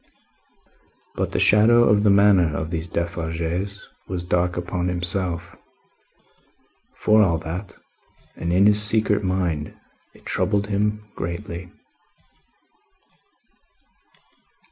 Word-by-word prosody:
But - - -3
the - - -2
shadow 115 +3 +5
of 105 -2 +3
the 105 - +3
manner 100 -6 +4
of 80 +1 -4
these 85 0 -3
Defarges 85 +3 -3 0.2
was 90 -2 -4
dark 90 0 0
upon 90 0 -3
himself, 90 -1 -2 1.4
for 110 0 +3
all 85 -5 +3
that, 85 +4 -7 0.6
and 85 - -3
in 95 +3 +4
his 105 0 +5
secret 105 -1 +1
mind 90 -5 -2 0.4
it - - -20
troubled 100 +2 0
him 105 +1 -1
greatly. 85 +1 -6
90 Hz, 100 wpm, -22 LUFS, 85-105 Hz, 1.4 s, shadow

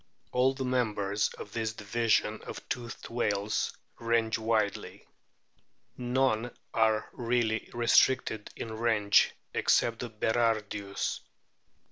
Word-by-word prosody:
All 130 +2 +3
the 130 - -3
members 105 -5 0
of 105 - -9
this 110 -2 -2
division 110 0 0
of - - -5
the - - -8
toothed 120 -2 -5
whales 105 -3 0 0.3
range 115 -1 +1
widely. 110 -3 -1 0.9
None 125 -2 +1 0.2
are 110 -1 +2
really 115 -2 0
restricted 120 -2 +3
in 110 - -6
range, 110 -3 +3 0.2
except 115 -1 +2
the 120 - -4
Berardius. 110 -3 -1
115 Hz, 105 wpm, -30 LUFS, 105-120 Hz, 0.9 s, All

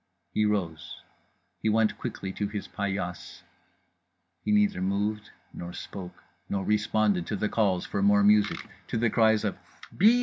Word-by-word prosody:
He 105 - +2
rose. 95 -7 -2 0.7
He 110 - +1
went 110 0 +2
quickly 95 -1 -4
to 105 - -2
his 100 0 -5
paillasse. 95 -3 -4 1.0
He - - 0
neither 210 - +3
moved 105 +3 -1 0.2
nor 85 0 -7
spoke 90 -3 -8 0.3
nor 100 -1 -1
responded 105 -3 +1
to - - -1
the 105 +1 -1
calls 95 -5 +1
for 100 - -2
more 100 0 +5
music, 105 0 +3 0.2
to - - -2
the 115 -1 +2
cries 110 -2 +4
of 105 - -2 0.4
"_Bis! 225 +6 +6
105 Hz, 155 wpm, -28 LUFS, 95-110 Hz, 1.0 s, Bis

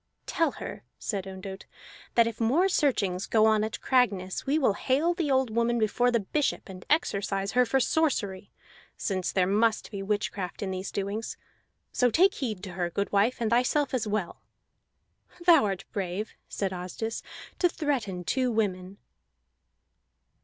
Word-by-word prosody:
"Tell 330 - +1
her," - - -7
said 195 -3 -3
Ondott, 190 0 -8 0.5
"that 235 - +6
if 230 0 -4
more 280 +12 +3
searchings 215 - +1
go 220 -1 +4
on 215 -1 +4
at 220 0 -3
Cragness, 205 -8 +1
we 285 +3 +3
will 260 -9 +3
hale 280 - +1
the 335 -4 -2
old 260 -3 +2
woman 235 +1 +1
before 235 +3 +2
the 235 -2 +2
bishop 290 +9 -1
and 185 -1 -9
exorcise 200 - 0
her 250 -1 +3
for 270 - +2
sorcery, 225 -10 0 0.5
since 185 -3 -1
there 185 -2 +2
must 215 +4 +1
be 200 -2 -5
witchcraft 200 -2 -2
in 190 - -2
these 185 +1 -4
doings. 200 +3 -3 0.5
So 250 - +3
take 375 - +4
heed 215 -8 -4
to 190 - -6
her, 175 0 -2
goodwife, 200 +5 +1
and 230 -2 0
thyself 255 +4 +2
as 240 -4 0
well." 205 -4 -2 1.0
"Thou 330 -8 +7
art 195 -1 -3
brave," 195 +2 -3 0.2
said 195 -2 -2
Asdis, 185 +5 -4 0.4
"to 355 - +4
threaten 240 - -2
two 255 +6 +1
women." 195 -3 -1
215 Hz, 155 wpm, -28 LUFS, 195-255 Hz, 1.0 s, Thou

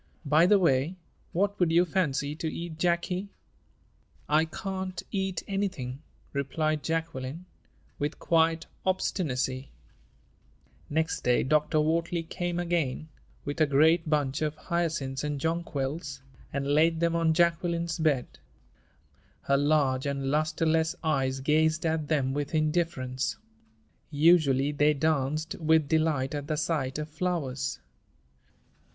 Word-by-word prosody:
By 155 +4 +5
the 205 - +6
way, 165 -2 +2 0.4
what 200 +3 0
would 175 -3 +3
you 170 +2 +5
fancy 150 -5 -1
to 160 -1 -3
eat, 170 -1 -6
Jacky?" 180 +3 0 1.0
"I 155 +2 +3
can't 190 +2 -5
eat 190 -3 -2
anything," 180 -10 -3 0.3
replied 155 +2 -1
Jacqueline, 160 -1 -3 0.5
with 145 +2 -2
quiet 165 -1 +2 0.2
obstinacy. 135 -8 -1 1.2
Next 160 +2 0
day 125 0 +3
Dr. 150 +3 +2
Wortley 165 +2 0
came 175 +1 -3
again, 165 -4 -1 0.4
with 145 +2 -3
a 155 - +5
great 160 +4 +4
bunch 145 -2 0
of 155 -1 -1
hyacinths 160 -6 -2
and 150 -1 -2
jonquils, 145 -3 -3 0.3
and 140 0 -2
laid 160 +3 +3
them 170 0 +1
on 165 -1 +3
Jacqueline's 170 -1 +1
bed. 150 -6 0 1.0
Her 140 - +2
large 140 -2 +2
and 135 -1 -2
lusterless 160 +1 +1
eyes 135 -4 0
gazed 155 +3 +2
at 160 -2 0
them 140 -4 +1
with 145 +2 -2
indifference. 155 -5 0 0.7
Usually 145 -3 +4
they 150 +1 +3
danced 155 +1 0
with 160 -2 +3
delight 155 -4 +1
at 145 -1 -4
the 155 -1 -1
sight 150 -4 -1
of 150 0 -4
flowers. 150 -6 -2
155 Hz, 120 wpm, -28 LUFS, 140-170 Hz, 1.2 s, the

